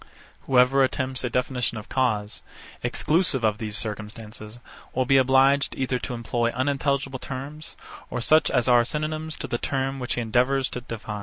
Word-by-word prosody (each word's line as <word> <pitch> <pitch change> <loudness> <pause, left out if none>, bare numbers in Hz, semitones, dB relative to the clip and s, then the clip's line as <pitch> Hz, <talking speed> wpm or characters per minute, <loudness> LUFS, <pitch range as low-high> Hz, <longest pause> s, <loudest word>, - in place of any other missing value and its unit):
Whoever 130 +1 +5
attempts 130 0 -1
a 125 - 0
definition 125 -1 -1
of 110 - -8
cause, 110 -6 -1 0.4
exclusive 145 +2 +1
of 105 -1 +1
these 105 -2 -3
circumstances, 110 +1 -6 0.4
will 130 0 +2
be 135 +1 +4
obliged 135 +2 +4
either 130 -1 -1
to 125 - -4
employ 120 0 -1
unintelligible 135 +1 -1
terms 140 +5 -6 0.3
or 125 - -3
such 155 +6 +4
as 125 -2 +1
are 120 -1 +6
synonymous 155 +3 -3
to - - -5
the 120 - -2
term 135 0 -2
which 125 - -2
he 120 - -1
endeavours 125 +4 +1
to 125 - -4
define. 110 -3 -6
130 Hz, 165 wpm, -25 LUFS, 115-135 Hz, 0.4 s, are